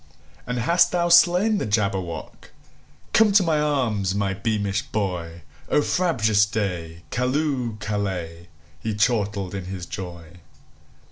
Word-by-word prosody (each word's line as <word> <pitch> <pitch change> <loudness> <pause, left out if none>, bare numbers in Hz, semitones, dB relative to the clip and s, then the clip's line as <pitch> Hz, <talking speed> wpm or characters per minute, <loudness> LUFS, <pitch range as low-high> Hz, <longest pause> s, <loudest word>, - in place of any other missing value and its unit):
"And 125 0 -2
hast 170 +9 +3
thou 175 -1 +1
slain 180 +5 +5
the - - -2
Jabberwock? 95 -6 -2 0.6
Come 215 -1 +5
to 200 -1 +6
my 160 -3 +1
arms, 115 -10 0
my 100 -1 0
beamish 100 0 -1
boy!O 85 - -3
frabjous 110 - +2
day! 85 -6 -4
Callooh! 125 -3 -1
Callay!"He 90 -2 -5
chortled 105 -4 0
in 95 -2 -5
his 95 -1 -6
joy. 90 -3 -8
105 Hz, 115 wpm, -23 LUFS, 90-130 Hz, 0.6 s, to